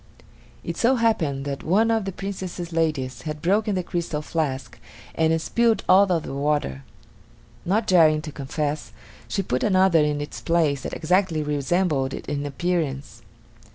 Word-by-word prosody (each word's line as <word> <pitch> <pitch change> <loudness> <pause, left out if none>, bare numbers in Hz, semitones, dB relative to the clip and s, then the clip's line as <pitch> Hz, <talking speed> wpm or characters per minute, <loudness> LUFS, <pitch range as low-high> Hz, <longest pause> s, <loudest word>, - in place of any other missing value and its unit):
It - - -5
so 250 +3 +3
happened 160 - 0
that 140 -1 -4
one 215 +7 +2
of 225 -3 +1
the 195 - -3
Princess's 185 -3 -6
ladies 155 -6 -1
had 150 -1 -5
broken 205 +5 +1
the 185 - -1
crystal 170 -4 -3
flask 150 -5 -3 0.3
and 160 0 +2
spilled 230 +6 +1
all 190 +1 +6
of 165 -3 +1
the - - -6
water. 140 - -1 0.8
Not 215 +5 +1
daring 160 -6 +5
to 155 - -6
confess, 145 -3 -4 0.3
she 195 +12 -1
put 125 -7 -1
another 185 -4 +4
in 150 -1 +1
its 145 - -6
place 160 -5 +1
that - - -5
exactly 175 -1 +1
resembled 150 -1 0
it - - -8
in 145 0 -2
appearance. 145 -3 -2
160 Hz, 155 wpm, -24 LUFS, 145-185 Hz, 0.8 s, all